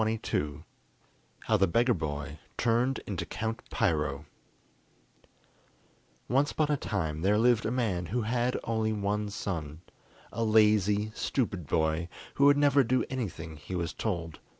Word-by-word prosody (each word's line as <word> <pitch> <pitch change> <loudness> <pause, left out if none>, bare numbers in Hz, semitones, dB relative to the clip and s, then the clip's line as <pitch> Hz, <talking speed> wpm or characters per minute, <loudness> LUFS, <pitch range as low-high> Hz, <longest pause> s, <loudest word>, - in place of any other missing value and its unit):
] 60 -6 -32
How 110 - +2
the 95 0 +3
Beggar 120 +7 +3
Boy 75 -3 -4 0.2
Turned 120 +3 +1
into 100 -4 -3
Count 110 +1 -4
Piro 75 -3 0 2.0
Once 140 +4 +2
upon 150 -1 +1
a - - +3
time 80 - -2
there 100 +3 +3
lived 115 0 +3
a - - -1
man 105 -9 -1
who 120 +5 -1
had 120 +2 0
only 110 -1 0
one 105 0 -1
son, 80 -6 -4 0.5
a 115 - -2
lazy, 105 -1 +3
stupid 100 - -2
boy, 80 +3 0 0.2
who 140 - +3
would 145 0 +6
never 145 -1 +5
do 130 +2 +1
anything 85 - -4
he 75 +5 -7
was 85 -1 -2
told. 85 -7 -3
105 Hz, 140 wpm, -29 LUFS, 85-120 Hz, 2.0 s, would